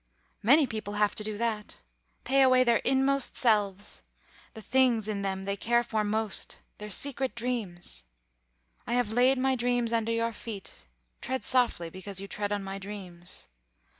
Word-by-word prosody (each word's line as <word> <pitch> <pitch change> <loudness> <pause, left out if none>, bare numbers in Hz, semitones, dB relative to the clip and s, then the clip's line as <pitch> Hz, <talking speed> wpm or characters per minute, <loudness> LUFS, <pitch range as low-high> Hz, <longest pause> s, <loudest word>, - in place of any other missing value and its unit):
Many 280 +7 +6
people 215 -4 -5
have 210 0 +2
to 215 - -5
do 210 -1 -4
that; 220 -2 -2 0.5
pay 275 +1 +3
away 255 -1 +6
their 235 -2 +4
own - - +2
inmost 270 0 +2
selves, 205 -4 +1 0.5
the - - -7
things 240 -2 +3
in 205 -2 -2
them 190 -1 -3
they 200 0 -1
care 235 +4 +2
for 220 -2 -1
most, 215 0 -1 0.2
their 210 0 -7
secret 270 +4 +1
dreams. 210 - -3 0.8
'I - - -1
have 245 -3 +1
laid 255 +3 +4
my 265 +1 +2
dreams 245 -1 0
under 230 0 +1
your 230 0 0
feet. 195 - -8 0.3
Tread 260 +1 -3
softly, 240 -10 +1
because 190 +1 -5
you 195 - -6
tread 205 0 -2
on 205 -1 -1
my 195 0 -5
dreams. 185 -3 -7
220 Hz, 165 wpm, -29 LUFS, 200-245 Hz, 0.8 s, Many